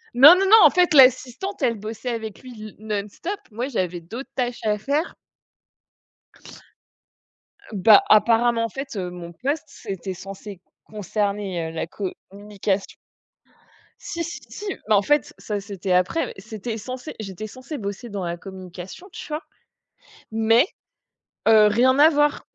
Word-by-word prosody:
Non, 295 +8 +10
non, 390 +1 +1
non, 440 +3 +9
en 305 - +9
fait, 355 -1 +3
l'assistante, 265 +6 +4
elle 235 -2 +3
bossait 220 +3 -6
avec 220 +1 -6
lui, 255 -1 -10
le 215 -1 -9
non-stop. 215 - -4
Moi, 240 +5 -3
j'avais 180 -9 -2
d'autres 230 +11 -8
tâches 245 -2 -2
à 210 -1 +1
faire. 290 - -2 2.6
Bah, 205 +2 +7
apparemment, 230 +2 +4
en - - -4
fait, 275 +1 -7
heu, 180 -2 -3
mon 175 -1 -9
poste, 285 - -2
c'était 195 -3 -6
censé 195 +1 -9 0.3
concerner, 200 -4 -3
heu, - - -8
la 165 0 -4
communication. 200 +1 -4 1.1
Si, 335 0 -4
si, 335 - -6
si 420 - -8 0.2
mais 215 - +4
en 200 - +5
fait, 295 +6 +1
ça, 210 -2 -4
c'était 195 -2 -5
après 180 - +2
mais - - -8
c'était 220 +3 -6
censé 255 +6 -7
j'étais 210 +1 -6
censée 260 +6 -8
bosser 205 +1 -6
dans 200 -2 -4
la 170 0 -3
communication, 185 - -10
tu - - -9
vois? 305 0 -4 0.9
Mais 225 +6 +4 0.8
heu, 215 -1 +7
rien 250 +5 +3
à 310 +2 +8
voir. 295 -1 +1
220 Hz, 150 wpm, -23 LUFS, 195-260 Hz, 2.6 s, Non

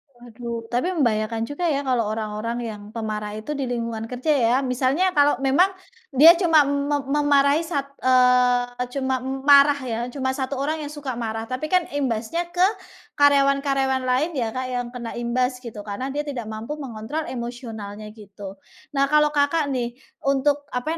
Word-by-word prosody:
Waduh, 235 -1 -7
tapi 245 +8 0
membahayakan 225 -3 0
juga 310 +7 -3
ya, 285 -1 0
kalo 250 -3 +1
orang-orang 215 +2 -3
yang 210 -2 -6
pemarah 215 -1 -4
itu 255 +8 -5
di 275 -3 -3
lingkungan 230 -2 -3
kerja 255 +5 0
ya, 240 -3 +3
misalnya 270 +9 +1
kalo 290 -2 +4
memang 335 +9 +4 0.4
dia 310 +5 +8
cuma 330 -4 +4
me 285 +1 0
memarahi 285 +1 +3
sat 300 -5 -2 0.2
eee, 250 -1 +3
cuma 260 -1 0
m 265 +1 -5
marah 285 0 +7
ya, 230 -2 -3
cuma 260 0 -2
1 265 0 -3
orang 305 +3 -2
yang 290 - -5
suka 290 -4 -5
marah, 225 -1 -4
tapi 255 +6 -4
kan 365 -2 +3
imbasnya 275 +5 -2
ke 360 +1 +3 0.5
karyawan-karyawan 275 -2 +3
lain 285 +7 +1
ya 235 -5 -1
Kak 255 0 -2
yang 245 -1 -2
kena 240 -2 -7
imbas 250 +2 -1
gitu, 215 -4 -8
karena 215 +7 -4
dia 295 +2 -2
tidak 240 -6 -5
mampu 220 +6 -5
mengontrol 250 +5 -5
emosionalnya 225 -4 -7
gitu. 200 -2 -11 0.4
Nah 275 - +4
kalau 300 0 +5
Kakak 290 +1 +1
nih, 240 -3 -2 0.3
untuk 280 +1 +1
apa 310 +7 -2
260 Hz, 165 wpm, -23 LUFS, 235-285 Hz, 0.5 s, dia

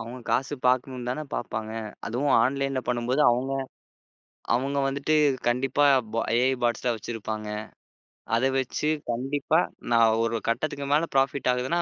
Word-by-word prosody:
அவங்க 115 +3 -7
காசு 135 +2 0
பாக்கணும்னுதானே 125 +1 0
பாப்பாங்க. 110 0 -4 0.3
அதுவும் 135 +5 +1
ஆன்லைன்ல 135 0 0
பண்ணும்போது 125 +3 0
அவங்க 125 +3 0 1.0
அவங்க 135 +3 -1
வந்துட்டு 140 +3 0 0.3
கண்டிப்பா 135 +4 +2 0.3
பா 115 - +1 0.2
எ.ஐ. 130 +2 +3
பாட்ஸ் 120 -2 0
எல்லாம் 120 -2 0
வச்சிருப்பாங்க. 110 -1 -5 0.9
அதை 130 +3 +2
வச்சு 135 +3 -1 0.2
கண்டிப்பா 135 +6 0 0.3
நான் 115 -1 +5
ஒரு 115 0 0
கட்டத்துக்கு 140 +3 -2
மேல 160 +3 +1
ப்ராஃபிட் 135 -1 +2
ஆகுதுன்னா 130 +8 0
130 Hz, 125 wpm, -26 LUFS, 120-140 Hz, 1.0 s, நான்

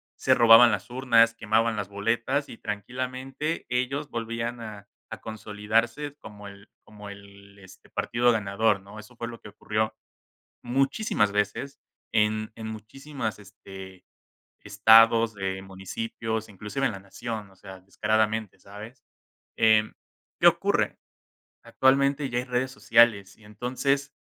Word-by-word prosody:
se - - +2
robaban 115 0 +8
las 100 +1 -3
urnas, 115 -2 +3
quemaban 115 0 +1
las 105 -2 -4
boletas 115 +7 -1
y - - -11
tranquilamente 130 - -4
ellos 130 +4 -2
volvían 115 +1 -4
a 105 -3 -9 0.2
a - - -8
consolidarse 115 +6 -2
como 105 -6 -11
el 100 +1 -14
como 105 -1 -12
el 100 0 -14
este, 95 -1 -16
partido 120 +1 +1
ganador, 105 -1 +1
¿no? 100 +2 -13
Eso 110 +4 -14
fue 115 0 -5
lo 115 -1 -9
que - - -12
ocurrió. 110 +1 -2 0.7
Muchísimas 135 - +1
veces 105 +7 -2 0.3
en 110 0 +1
en 110 -1 -7
muchísimos, 110 +2 -6
este, 95 -2 -12 0.6
estados 115 0 +5
de 95 -1 -4
municipios, 110 +4 -5
inclusive 105 +7 -3
en 115 - 0
la 100 - -7
nación, 105 +1 -7
o - - -23
sea, 95 -1 -11
descaradamente, 105 +1 -1
¿sabes? 105 +7 -12 0.5
Eh, 110 -1 +4 0.5
¿qué - - +1
ocurre? - - +2 0.7
Actualmente 140 +2 +2
ya 120 - -1
hay 125 - -2
redes 125 +1 -1
sociales 115 -6 +3
y 110 - -23
entonces 130 +6 -2
110 Hz, 135 wpm, -26 LUFS, 105-120 Hz, 0.7 s, robaban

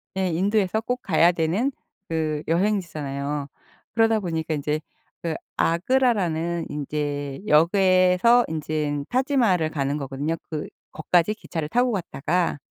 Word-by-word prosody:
네. 190 -1 0
인도에서 200 +3 +1
꼭 250 +2 -3
가야 170 0 +4
되는 175 - 0 0.4
그 155 -2 -1
여행지잖아요. 150 -7 -1 0.5
그러다 225 -1 +3
보니까 160 -4 -2
인제 150 +2 -2 0.4
그 165 -2 -2 0.2
아그라라는 170 -5 +1
인제 145 -1 -3
역에서 185 +7 +5
인제는 150 -2 -2
타지마할을 240 - +2
가는 140 -2 -1
거거든요. 140 +3 -3
그 155 -2 -4 0.2
거까지 175 +5 +2
기차를 165 -7 -5
타고 245 +3 +2
갔다가 175 -2 -1
165 Hz, 295 characters per minute, -24 LUFS, 150-200 Hz, 0.5 s, 역에서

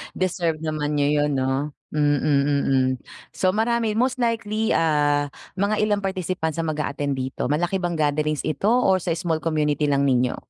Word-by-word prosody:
Deserve 170 -3 -1
naman 150 -1 -2
niyo 145 -1 +2 0.2
yun 145 -2 0
no? 135 +2 -1 0.2
Mm 145 -2 +2
mm 140 -2 +2 0.5
so 185 -1 +1
marami 225 -1 +1
most 250 +2 +1
likely, 225 -2 0
ah, 145 -2 +2 0.3
mga 200 +2 +1
ilang 205 -1 +1
participants 180 -4 -2
ang 165 - -1
mag-a-attend 145 -2 -2
dito 130 +1 -3
malaki 175 +6 0
bang 175 -2 -2
gatherings 150 0 0
ito 175 +6 -1
or 225 -6 +3
sa 175 - -1
small 165 -3 -1
community 150 -2 +1
lang 140 -1 +2
ninyo? 125 -1 +2
155 Hz, 160 wpm, -23 LUFS, 145-190 Hz, 0.5 s, or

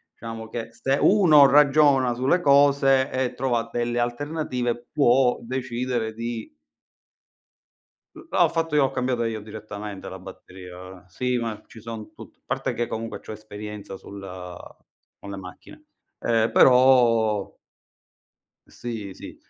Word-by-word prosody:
diciamo 115 -1 -8
che 115 0 -6
se 135 +4 -1
uno 165 -8 +6
ragiona 140 -3 +4
sulle 130 +9 +1
cose 140 -3 +4
e 130 -1 -1
trova 120 -3 -1
delle 120 0 -1
alternative 120 -2 -2
può 125 -2 +3
decidere 125 -2 -3
di 115 0 -5 1.7
Uhm, - - -13
là - - 0
ho - - +4
fatto 165 -2 -2
io, 145 -2 +4
ho - - 0
cambiata 125 -2 -1
io 110 -1 -3
direttamente 105 -1 -8
la 95 - -8
batteria. 90 0 -12
Sì, 125 +7 -2
ma 110 -3 -4
ci 115 - -14
sono 110 -1 -8
tut - - -14
parte - - -2
che 120 - -1
comunque 115 0 -5
c'ho - - -9
esperienza 105 -2 -8
sul 100 +1 -11 1.0
con 100 - -10
le 100 - -6
macchine. 90 -1 -12 0.4
Ehm, 115 -1 +1
però 120 -5 +4 1.1
Sì, 110 -5 -7
sì. - - -11
120 Hz, 130 wpm, -24 LUFS, 110-130 Hz, 1.7 s, uno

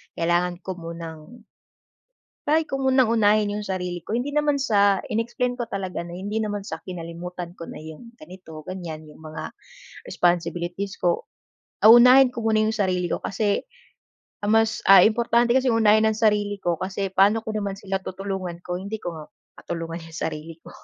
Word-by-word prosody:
kailangan 175 +1 +1
ko 190 - -5
munang" 165 -2 -8 1.2
"try 315 +2 +3
ko 270 0 -2
munang 260 -3 +3
unahin 210 -2 +3
yung 210 - -5
sarili 180 -2 -3
ko." - - -4
Hindi 280 +4 -3
naman 295 -1 +2
sa 200 -5 +3
in-explain 235 +3 -1
ko 240 - -2
talaga 190 -3 -4
na 170 - -9
hindi 205 +4 -3
naman 205 -2 -3
sa - - -6
kinalimutan 175 0 -7
ko 165 - -8
na - - -8
yung 160 +10 -11
ganito, 160 -1 -11
ganyan. 165 -4 -7
Yung 150 - -16
mga 155 0 -7 0.5
responsibilities 175 - -1
ko. 175 -1 0 0.6
Ah, 215 - +9
unahin 250 +2 +8
ko 235 - -5
muna 220 -1 +3
yung 220 - 0
sarili 185 -3 0
ko - - -2
kasi 205 0 -1 0.8
ang 210 - +2
mas 220 0 +1
ah, 195 - +10
importante 235 +1 +2
kasi 260 -1 +3
unahin 220 -1 +4
ang 215 - -2
sarili 210 -2 +1
ko 170 -2 0
kasi 195 +1 -3
paano 205 +4 +4
ko - - -5
naman 200 -2 -2
sila 195 -1 -3
tutulungan 185 -2 -5
kung 180 +1 -4
hindi 220 +2 -4
ko - - -3
nga 155 - -9 0.4
matulungan 165 0 -5
yung 165 0 -10
sarili 160 +1 -5
ko. - - -12
195 Hz, 175 wpm, -24 LUFS, 175-220 Hz, 1.2 s, ah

